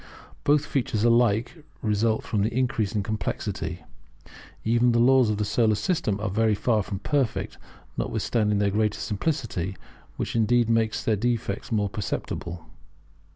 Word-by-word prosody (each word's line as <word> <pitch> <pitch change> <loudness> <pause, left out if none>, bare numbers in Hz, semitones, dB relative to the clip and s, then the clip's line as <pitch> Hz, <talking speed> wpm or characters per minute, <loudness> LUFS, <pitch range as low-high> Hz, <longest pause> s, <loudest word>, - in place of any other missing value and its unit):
Both 145 +1 +3
features 115 -7 -1
alike 120 +5 +2 0.2
result 110 +1 +1
from 105 - -1
the 110 +3 +1
increase 115 -4 0
of 105 - +1
complexity. 110 +1 -3 0.8
Even 120 +2 +3
the 115 - +3
laws 130 -1 +5
of 105 - 0
the 105 - 0
Solar 110 +1 +2
System 105 - -1
are 105 - -2
very 110 +2 +2
far 110 +1 +1
from 100 0 -4
perfect, 135 +3 -1 0.4
notwithstanding 105 -3 0
their 100 0 +2
greater 105 0 0
simplicity, 105 - -2 0.4
which - - -3
indeed 115 +1 +3
makes 115 -1 +1
their 110 - +2
defects 115 -1 -2
more 105 -2 +1
perceptible. 90 -5 -4
110 Hz, 145 wpm, -26 LUFS, 105-120 Hz, 0.8 s, laws